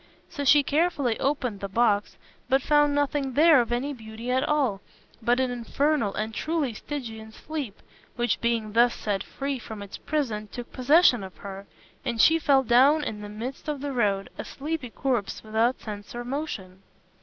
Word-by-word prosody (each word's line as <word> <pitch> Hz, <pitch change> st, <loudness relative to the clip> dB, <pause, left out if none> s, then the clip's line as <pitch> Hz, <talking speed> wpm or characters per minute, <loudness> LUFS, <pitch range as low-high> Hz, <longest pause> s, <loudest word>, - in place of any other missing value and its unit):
So 285 Hz, -4 st, -4 dB
she 290 Hz, +1 st, +6 dB
carefully 285 Hz, -5 st, +1 dB
opened 260 Hz, -7 st, -1 dB
the 200 Hz, -, -5 dB
box, 210 Hz, -1 st, +1 dB, 0.3 s
but 265 Hz, 0 st, +3 dB
found 295 Hz, -1 st, +3 dB
nothing 285 Hz, -2 st, 0 dB
there 305 Hz, -1 st, +6 dB
of 240 Hz, -, -4 dB
any 260 Hz, +4 st, -1 dB
beauty 225 Hz, 0 st, -6 dB
at 260 Hz, +1 st, +2 dB
all, 270 Hz, -10 st, +1 dB, 0.4 s
but 240 Hz, +2 st, +2 dB
an 260 Hz, -1 st, +1 dB
infernal 245 Hz, -1 st, 0 dB
and 220 Hz, +1 st, -3 dB
truly 305 Hz, 0 st, -1 dB
Stygian 220 Hz, -4 st, -7 dB
sleep, 280 Hz, -4 st, -6 dB, 0.4 s
which 240 Hz, -2 st, 0 dB
being 230 Hz, -3 st, 0 dB
thus 235 Hz, +1 st, +4 dB
set 200 Hz, -3 st, -2 dB
free 275 Hz, +3 st, -4 dB
from 220 Hz, -2 st, -8 dB
its 200 Hz, -, -9 dB
prison, 230 Hz, -9 st, -2 dB
took 245 Hz, -1 st, -8 dB
possession 260 Hz, -, +4 dB
of 190 Hz, -1 st, -10 dB
her, 195 Hz, 0 st, -8 dB, 0.4 s
and 235 Hz, -, -2 dB
she 325 Hz, +8 st, +6 dB
fell 275 Hz, -3 st, +4 dB
down 270 Hz, +6 st, +5 dB
in 210 Hz, -6 st, -4 dB
the 205 Hz, -, -7 dB
midst 240 Hz, +8 st, -6 dB
of 300 Hz, -2 st, -2 dB
the 280 Hz, 0 st, -4 dB
road, 200 Hz, -5 st, 0 dB
a -, -, -2 dB
sleepy 295 Hz, -2 st, -4 dB
corpse 240 Hz, -4 st, -2 dB
without 220 Hz, +3 st, +1 dB
sense 205 Hz, 0 st, -8 dB
or 240 Hz, 0 st, -5 dB
motion. 230 Hz, -9 st, -5 dB
245 Hz, 180 wpm, -26 LUFS, 220-285 Hz, 0.4 s, she